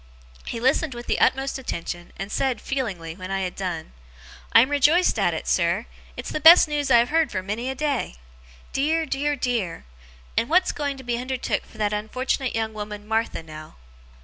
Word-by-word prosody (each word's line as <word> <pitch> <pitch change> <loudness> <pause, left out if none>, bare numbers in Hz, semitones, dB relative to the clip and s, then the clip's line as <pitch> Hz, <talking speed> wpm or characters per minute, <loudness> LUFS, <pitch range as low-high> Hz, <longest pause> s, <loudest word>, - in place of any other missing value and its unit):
He 230 - -4
listened 265 +2 +1
with 240 0 -7
the - - 0
utmost 270 0 +2
attention, 175 -7 -5
and 195 +2 -5
said, 260 -4 0
feelingly, 190 -12 -4
when 185 0 -8
I 195 0 -1
had 185 -1 -3
done: 175 - -4 0.6
'I 230 - +8
am 260 +4 +1
rejoiced 295 +6 +3
at - - +2
it, - - -6
sir! - - +1 0.3
It's - - -5
the - - -2
best 330 +2 +9
news 295 -2 -1
I 240 - +7
have 235 +1 +3
heard 320 -3 +2
for 185 -2 -3
many 220 +6 -3
a 265 - -3
day. 280 - -1 0.6
Dear, 315 +4 +1
dear, 290 0 -1
dear! 235 - -2 0.5
And 230 - +1
what's 365 +3 +4
going 285 -2 -3
to 265 - -10
be 240 -1 -2
undertook 255 0 -2
for - - -17
that 210 -1 0
unfortunate 255 +4 -2
young 220 -1 -1
woman, 210 0 -7
Martha, 225 -5 -1
now? 155 -1 -11
240 Hz, 195 wpm, -24 LUFS, 205-275 Hz, 0.6 s, best